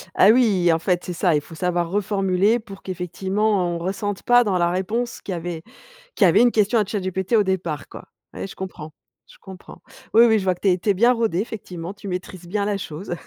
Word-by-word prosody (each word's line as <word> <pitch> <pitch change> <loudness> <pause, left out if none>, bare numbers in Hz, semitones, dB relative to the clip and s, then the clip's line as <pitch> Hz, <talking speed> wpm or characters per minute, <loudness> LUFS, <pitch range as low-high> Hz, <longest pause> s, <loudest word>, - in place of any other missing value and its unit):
Ah 195 - +6
oui! 205 -8 +4
En 165 - +1
fait, 180 +1 0
c'est 180 - -5
ça, 170 -2 +2
il 150 - +1
faut 165 - -13
savoir 175 -1 -1
reformuler 200 +2 +1
pour 195 -3 -12
qu'effectivement, 190 +1 -1
on - - -2
ressente 195 +3 -4
pas 245 0 +5
dans 195 -4 0
la 175 0 +2
réponse 220 +7 -2
qu'il 195 - -5
y - - -2
avait 170 -1 -5 0.5
qu'il 205 - +4
y - - +7
avait 170 - +5
une 245 -1 +5
question 215 +2 +2
à 210 - +1
ChatGPT, 190 0 -3
au 210 - +5
départ 175 -6 -3
quoi. - - -11 0.3
Ouais, - - -5
je - - -11
comprends, 160 -5 -8 0.3
je - - -18
comprends. 190 -2 -13 0.3
Oui, 230 +2 +7
oui, 220 -2 +4
je 190 - -4
vois 185 -1 +1
que - - -26
tu 200 - +3
es 180 - +3
tu 185 - -3
es 200 - +5
bien 235 +6 +4
rodé, 225 -7 0
effectivement, 185 -4 -6
tu 205 0 -11
maîtrises 180 -1 -6
bien 200 +3 -1
la 205 -1 -1
chose. 175 0 -6
190 Hz, 240 wpm, -22 LUFS, 175-210 Hz, 0.5 s, y